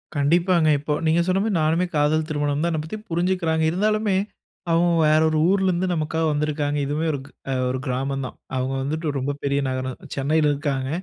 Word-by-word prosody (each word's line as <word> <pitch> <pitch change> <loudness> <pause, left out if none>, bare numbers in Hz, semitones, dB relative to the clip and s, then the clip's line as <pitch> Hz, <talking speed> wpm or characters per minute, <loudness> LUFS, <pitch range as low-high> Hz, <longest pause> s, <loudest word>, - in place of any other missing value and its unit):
கண்டிப்பாங்க. 170 +3 +3
இப்போ 150 +1 -2
நீங்க 165 +2 +3
சொன்ன 185 +1 +2
மாரி 215 -4 0
நானுமே 165 +4 +2
காதல் 155 +2 +2
திருமணம் 145 -1 -1
தான், 170 - +1
என்ன 155 -1 -1
பத்தி 190 +7 -6
புரிஞ்சுக்கிறாங்க. 170 -2 +1
இருந்தாலுமே, 210 +1 +1 0.6
அவுங்க 170 +1 +3
வேற 155 +1 +4
1 155 - 0
ஊர்லருந்து 185 -2 +2
நமக்காக 160 0 -1
வந்திருக்காங்க! 145 0 -1
இதுவுமே 150 +3 -1
ஒருக் 135 -2 -5 0.2
அ - - +1
1 130 0 -2
கிராமந்தான்; 135 0 -3 0.2
அவுங்க 130 +1 -1
வந்துட்டு 155 +4 -3
ரொம்ப 135 +2 -1
பெரிய 140 0 +1
நகரம் 130 0 -3 0.2
சென்னையில 150 +2 +2
இருக்காங்க 140 -2 -2
155 Hz, 170 wpm, -23 LUFS, 140-170 Hz, 0.6 s, வேற